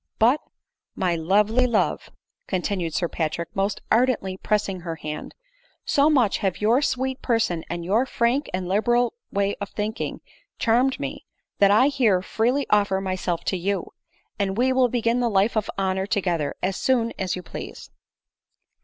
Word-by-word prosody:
" - - -61
But, 245 +7 +4 0.5
my 175 -2 0
lovely 210 +9 +2
love! 230 -3 0 0.2
" - - -55
continued 180 -3 -2
Sir 175 - +1
Patrick, 165 +1 -3
most 195 +1 -1
ardently 225 -5 +2
pressing 200 -1 -1
her 170 -1 -5
hand, 150 -1 -7 0.3
" - - -38
so 285 +2 +5
much 250 -9 +3
have 195 -4 -1
your 230 +6 +3
sweet 260 -2 -1
person, 225 -9 0
and 170 0 -4
your 220 +8 +2
frank 245 +5 0
and 185 0 -3
liberal 240 +5 +2 0.2
way 200 0 +1
of 200 - -4
thinking, 215 +2 -4 0.4
charmed 250 +3 +2
me, - - -6 0.3
that 200 - +6
I 220 +7 +5
here 225 -10 +2
freely 245 +8 0
offer 200 -2 +3
myself 185 -3 -2
to 190 - -1
you, 190 +1 -2 0.5
and 195 0 -1
we 260 +2 +3
will 255 -1 +3
begin 235 0 +1
the 240 -1 +1
life 205 +2 +2
of 215 -2 0
honor 190 0 0
together 175 -8 -1
as 190 +1 0
soon 235 -3 +1
as 190 -2 -1
you 180 - -7
please." - - -9
205 Hz, 170 wpm, -24 LUFS, 185-240 Hz, 0.5 s, that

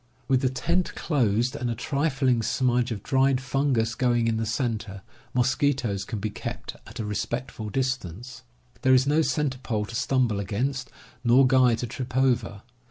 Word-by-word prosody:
With 130 -2 +3
the 130 - +2
tent 170 +7 -1
closed, 120 - +1
and 120 - -2
a 115 - -1
trifling 135 -3 +1
smudge 125 +1 +1
of 105 -3 -4
dried 135 -1 +2
fungus 130 -3 0
going 120 -1 +1
in 115 -1 +1
the 110 0 -2
center, 110 -5 -3 0.3
mosquitoes 125 -5 +1
can 110 - -4
be 105 +1 -3
kept - - -6
at - - -10
a 110 - -2
respectful 110 +1 -3
distance. 125 -2 -3 0.4
There 130 -1 +5
is 130 +1 +4
no 150 +3 +3
center 150 -4 0
pole 110 -4 -2
to 115 - -10
stumble 120 -3 +1
against, 125 +7 -2 0.3
nor 125 +2 +6
guy 130 -2 +5
to 120 - -4
trip 125 +1 -5
over. 120 -6 +1
125 Hz, 165 wpm, -26 LUFS, 110-130 Hz, 0.4 s, nor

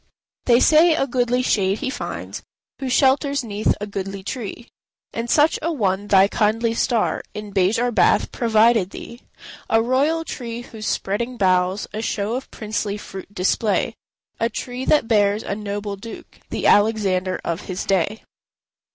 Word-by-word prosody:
They 240 -1 +5
say 315 +4 +5
a 270 - +1
goodly 250 -1 0
shade 195 -4 +1
he 260 - -3
finds - - -6 0.4
Who 265 - -3
shelters 275 +1 +2
'neath 210 -2 0
a 205 - -3
goodly 195 -1 -5
tree; 235 +1 -6 0.5
And 230 +1 -4
such 300 +4 +3
a 335 +2 -1
one 200 - -1
thy 195 -1 +5
kindly 225 +2 +1
star 230 -1 0
In 210 -1 -6
Bejar 205 +6 +2
bath 210 -6 +3
provided 225 -3 +3
thee: 235 +4 -10 0.5
A 225 - +4
royal 280 +8 +1
tree 240 -4 -6
whose 220 -2 -8
spreading 235 +6 -2
boughs 185 0 +2
A 215 - -3
show 210 -1 -2
of 260 +2 -4
princely 210 -1 -3
fruit 195 -1 -9
display; 205 +3 0 0.5
A 230 - +1
tree 250 +3 -5
that 295 -6 +3
bears 205 -1 +2
a - - -3
noble 205 0 -4
Duke, 225 +4 -11
The - - -3
Alexander 195 -4 +2
of 170 +3 -3
his 185 -1 -4
day. 195 +3 0
220 Hz, 155 wpm, -21 LUFS, 200-245 Hz, 0.5 s, They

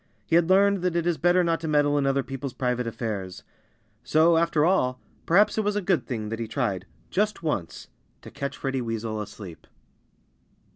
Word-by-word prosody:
He 165 - +1
had 170 0 +3
learned 200 +1 +4
that 180 -1 -1
it 170 -1 0
is 175 -2 0
better 175 +1 +3
not 165 -1 +1
to 165 - -5
meddle 145 -1 +2
in 140 -1 +1
other 135 0 +1
people's 135 -1 -6
private 125 -1 -1
affairs. 105 -6 -5 0.6
So, 160 +6 +4
after 165 -2 +2
all, 130 -9 +1 0.3
perhaps 205 +5 +4
it - - +1
was 205 0 0
a - - +1
good 180 -7 0
thing 110 -4 -4
that 115 +1 -4
he 115 - -3
tried, 105 -7 -2 0.2
just 210 -2 0
once, 100 - -3 0.4
to - - -11
catch 140 0 -5
Freddie 135 -1 -2
Weasel 115 -2 -3
asleep. 100 -5 -10
140 Hz, 190 wpm, -25 LUFS, 115-170 Hz, 0.6 s, learned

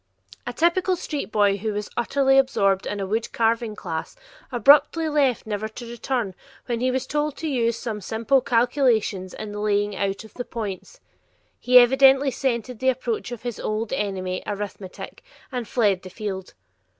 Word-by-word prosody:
A - - -1
typical 345 +6 +2
street 295 -7 -5
boy 205 -2 +3
who 215 +2 -3
was 210 0 -3
utterly 270 +3 +3
absorbed 195 -7 +1
in 205 - -3
a 195 - -2
wood 220 +4 -2
carving 230 -1 0
class, 165 -6 -5 0.4
abruptly 290 +6 +5
left 285 -5 +1
never 215 0 -3
to 230 +3 -9
return 235 -3 -2 0.3
when 235 -2 -2
he 255 +2 +1
was 255 0 -1
told 295 -1 -2
to 325 - -4
use 235 -5 0
some 220 -4 -5
simple 230 +6 +1
calculations 230 -6 +1
in 215 -1 -6
the 210 - -6
laying 205 -1 0
out 195 +1 -2
of 220 - -15
the 245 - -5
points. 225 - -6 0.6
He 250 0 +5
evidently 270 +2 +6
scented 250 -2 -2
the 260 - +2
approach 245 -2 -2
of 235 -2 -7
his 240 -3 -4
old 215 +2 -2
enemy, 190 -6 -2
arithmetic, 205 -2 -6 0.3
and 245 -4 -4
fled 205 -6 +2
the 185 - -10
field. 190 -2 -6
230 Hz, 170 wpm, -24 LUFS, 205-260 Hz, 0.6 s, evidently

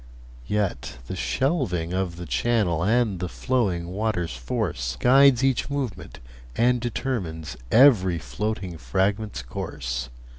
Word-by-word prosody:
Yet 100 -11 -2
the 95 - -5
shelving 95 - -1
of 95 -2 -1
the 90 0 -7
channel 100 -5 +1
And 110 -2 +2
the 90 0 -3
flowing 95 -10 -1
water's 95 - -2
force - - -3
Guides 135 0 +6
each 130 -2 +1
movement, 125 - -4 0.4
and 125 +1 +3
determines 95 - -3 0.2
Every 110 -9 +6
floating 95 -1 -4
fragment's 95 - -1
course. 60 0 -4
95 Hz, 115 wpm, -25 LUFS, 85-120 Hz, 0.4 s, Guides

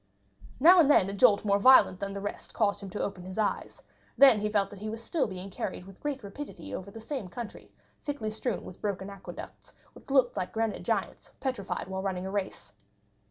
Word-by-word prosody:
Now 350 +6 +8
and 305 -4 +6
then 195 -10 +5
a - - -6
jolt 210 0 +4
more 200 -1 +3
violent 230 -5 +6
than 195 0 -4
the 200 - -5
rest 205 - -6
caused 205 -2 +1
him 195 - -8
to 205 - -3
open 195 -3 -4
his 185 +2 -8
eyes; 215 -2 -2 0.3
then 265 -6 +8
he 210 +1 -1
felt 200 -2 +1
that 200 - -10
he 215 +1 -4
was 225 +1 -6
still 315 +4 0
being 190 0 -7
carried 180 - -5
with 195 -1 -14
great 285 -4 -3
rapidity 200 - -8
over 190 - -5
the 225 - -10
same 225 -2 -5
country, 230 +4 -8 0.3
thickly 260 -7 -3
strewn 220 0 -3
with 180 - -11
broken 200 -1 -3
aqueducts, 195 -1 -10 0.2
which - - -16
looked 265 -3 +3
like 185 - -3
granite 225 -1 -1
giants - - -2
petrified 255 -10 -3
while 190 0 -4
running 190 -1 -2
a 190 - -4
race. 185 - -4
205 Hz, 210 wpm, -29 LUFS, 190-240 Hz, 0.3 s, Now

